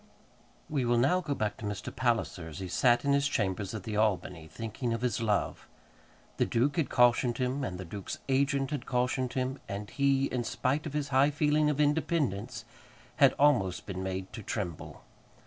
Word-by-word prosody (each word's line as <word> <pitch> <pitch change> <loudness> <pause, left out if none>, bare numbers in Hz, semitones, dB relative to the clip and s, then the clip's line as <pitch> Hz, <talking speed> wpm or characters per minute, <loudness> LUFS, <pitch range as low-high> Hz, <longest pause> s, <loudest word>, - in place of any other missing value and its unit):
We 145 -4 -1
will 120 0 +2
now 140 +10 +3
go 145 -5 -2
back 105 -4 -2
to 110 - -7
Mr. 105 -2 -5
Palliser 115 -9 0
as 80 - -9
he 95 -1 -5
sat 120 +8 +3
in 140 - +3
his 140 0 +3
chambers 100 -3 -1
at 105 - -5
the 105 0 -3
Albany, 90 -6 0
thinking 115 - -4
of 115 - -5
his 125 -2 0
love. 105 -3 -1 0.7
The - - +3
duke 135 +5 +1
had 160 - +1
cautioned 120 0 +3
him, 130 +2 -1
and 90 -8 -3
the 95 - -7
duke's 100 +3 -6
agent 135 +1 +1
had 145 -4 -4
cautioned 125 0 0
him; 130 +1 -2
and 100 +1 -5
he, 140 -1 +2
in 125 -3 -2
spite 135 +6 -1
of 150 - -7
his 150 -2 -2
high 135 +2 +4
feeling 150 0 +2
of 150 -1 -1
independence, 140 - 0 0.5
had - - +6
almost 125 -11 +2
been 95 -2 -5
made 95 0 -4
to 110 - -6
tremble. 95 -6 -5
120 Hz, 190 wpm, -30 LUFS, 105-140 Hz, 0.7 s, had